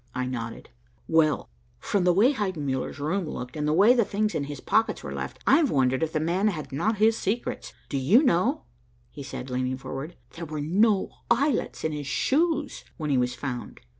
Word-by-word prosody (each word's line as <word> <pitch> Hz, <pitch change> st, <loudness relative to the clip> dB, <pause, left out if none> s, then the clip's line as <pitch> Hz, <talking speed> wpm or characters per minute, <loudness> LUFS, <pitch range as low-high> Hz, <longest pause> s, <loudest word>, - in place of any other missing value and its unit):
I 130 Hz, -, -1 dB
nodded. 115 Hz, -, -6 dB, 0.4 s
"Well, 160 Hz, -2 st, +2 dB, 0.3 s
from 185 Hz, -, 0 dB
the 180 Hz, -, +5 dB
way 215 Hz, +10 st, +4 dB
Heidenmuller's 155 Hz, -, -2 dB
room 160 Hz, +3 st, -1 dB
looked, 125 Hz, +2 st, -6 dB
and 150 Hz, -1 st, -1 dB
the -, -, +2 dB
way 200 Hz, +9 st, +6 dB
the 240 Hz, -2 st, +3 dB
things 210 Hz, +1 st, -1 dB
in 145 Hz, -, -1 dB
his 145 Hz, -1 st, -7 dB
pockets 225 Hz, -, +1 dB
were -, -, -5 dB
left, -, -, -5 dB
I've 310 Hz, -5 st, +5 dB
wondered 130 Hz, -, +2 dB
if 160 Hz, -1 st, 0 dB
the 155 Hz, -, 0 dB
man 175 Hz, +6 st, +1 dB
had 155 Hz, -9 st, -3 dB
not 210 Hz, +11 st, 0 dB
his 220 Hz, +2 st, +4 dB
secrets. 225 Hz, +3 st, -3 dB, 0.2 s
Do 140 Hz, -, -2 dB
you 200 Hz, -, +5 dB
know," 180 Hz, -, +2 dB, 0.5 s
he -, -, -9 dB
said, 130 Hz, -1 st, -7 dB
leaning 130 Hz, +1 st, -1 dB
forward, 135 Hz, +5 st, -6 dB, 0.2 s
"there 170 Hz, 0 st, -7 dB
were 155 Hz, -1 st, -5 dB
no 195 Hz, +7 st, +2 dB, 0.2 s
eyelets 260 Hz, +1 st, +1 dB
in 160 Hz, -, 0 dB
his 145 Hz, -2 st, -5 dB
shoes 300 Hz, -, 0 dB
when 150 Hz, -3 st, -2 dB
he 135 Hz, -, +3 dB
was 125 Hz, 0 st, 0 dB
found. 125 Hz, -4 st, -6 dB
160 Hz, 195 wpm, -26 LUFS, 135-215 Hz, 0.5 s, way